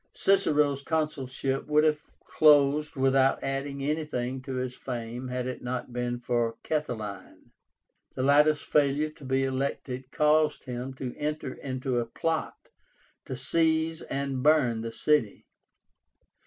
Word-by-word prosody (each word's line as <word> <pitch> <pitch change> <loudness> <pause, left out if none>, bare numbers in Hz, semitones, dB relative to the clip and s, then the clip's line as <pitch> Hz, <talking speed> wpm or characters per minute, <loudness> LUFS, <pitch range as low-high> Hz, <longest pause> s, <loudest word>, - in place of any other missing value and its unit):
Cicero's 150 -8 +3
consulship 135 -4 -2
would 150 0 +4
have 155 -1 +2 0.2
closed 150 0 +4
without 135 0 +3
adding 135 0 -3
anything 135 -4 -2
to 130 0 -6
his 125 0 -3
fame 120 0 -5
had 125 0 -3
it 130 0 -5
not 125 0 -4
been 120 0 -2
for 120 -1 -1
Catiline. 110 -11 -4 0.6
The 130 - -2
latter's 150 +2 +4
failure 150 +1 +1
to 155 -1 -17
be 135 0 +1
elected 130 -1 -3
caused 155 0 +2
him 125 +1 -5
to 130 -2 -5
enter 150 -3 -3
into 130 -2 -3
a 115 - -2
plot 160 +7 -3 0.6
to 130 - -5
seize 160 +4 +1
and 135 -2 -3
burn 135 -6 +3
the 115 0 -4
city. 145 -4 +1
135 Hz, 130 wpm, -28 LUFS, 125-150 Hz, 0.6 s, would